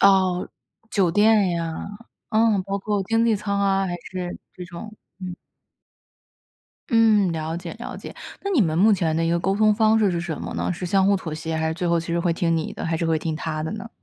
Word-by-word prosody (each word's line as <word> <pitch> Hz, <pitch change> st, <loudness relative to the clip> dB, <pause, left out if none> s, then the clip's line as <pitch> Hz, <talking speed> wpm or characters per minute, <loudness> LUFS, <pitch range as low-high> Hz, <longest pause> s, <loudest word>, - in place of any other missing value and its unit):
哦， 190 Hz, -2 st, +4 dB, 0.4 s
酒 190 Hz, -4 st, +2 dB
店 210 Hz, 0 st, +4 dB
呀， 165 Hz, -2 st, -3 dB, 0.4 s
嗯， 220 Hz, -3 st, +3 dB
包 195 Hz, +1 st, -3 dB
括 205 Hz, 0 st, -1 dB
经 225 Hz, +3 st, +2 dB
济 230 Hz, -1 st, +3 dB
舱 200 Hz, -1 st, -2 dB
啊 195 Hz, -1 st, +2 dB
还 175 Hz, -, -3 dB
是 180 Hz, +1 st, -6 dB
这 180 Hz, -, -8 dB
种 185 Hz, +5 st, -9 dB, 0.3 s
嗯。 180 Hz, -1 st, -6 dB, 1.5 s
嗯， 220 Hz, -4 st, +4 dB
了 160 Hz, 0 st, -3 dB
解 170 Hz, -1 st, -7 dB
了 235 Hz, -, -6 dB
解。 -, -, -9 dB, 0.3 s
那 400 Hz, -, -2 dB
你 350 Hz, -9 st, +3 dB
们 160 Hz, -4 st, 0 dB
目 210 Hz, +5 st, +5 dB
前 170 Hz, -5 st, +1 dB
的 165 Hz, -, +1 dB
一 -, -, +1 dB
个 170 Hz, -, +2 dB
沟 195 Hz, +3 st, 0 dB
通 215 Hz, +1 st, +4 dB
方 220 Hz, 0 st, +4 dB
式 210 Hz, -3 st, +3 dB
是 170 Hz, -1 st, -1 dB
什 170 Hz, -3 st, -4 dB
么 -, -, -5 dB
呢？ -, -, -1 dB
是 180 Hz, +1 st, -5 dB
相 190 Hz, +1 st, +3 dB
互 200 Hz, -, +4 dB
妥 170 Hz, -4 st, -6 dB
协， 160 Hz, +1 st, -4 dB
还 160 Hz, 0 st, 0 dB
是 160 Hz, -, -2 dB
最 180 Hz, +1 st, -2 dB
后 170 Hz, -1 st, +2 dB
其 165 Hz, -, -8 dB
实 170 Hz, 0 st, -1 dB
会 170 Hz, 0 st, +1 dB
听 165 Hz, 0 st, +1 dB
你 160 Hz, -, -3 dB
的， -, -, -6 dB
还 165 Hz, 0 st, 0 dB
是 165 Hz, -, -2 dB
会 160 Hz, -1 st, +2 dB
听 160 Hz, 0 st, -3 dB
他 155 Hz, 0 st, -3 dB
的 160 Hz, -, -3 dB
呢？ 220 Hz, +2 st, -6 dB
185 Hz, 250 characters per minute, -23 LUFS, 165-205 Hz, 1.5 s, 目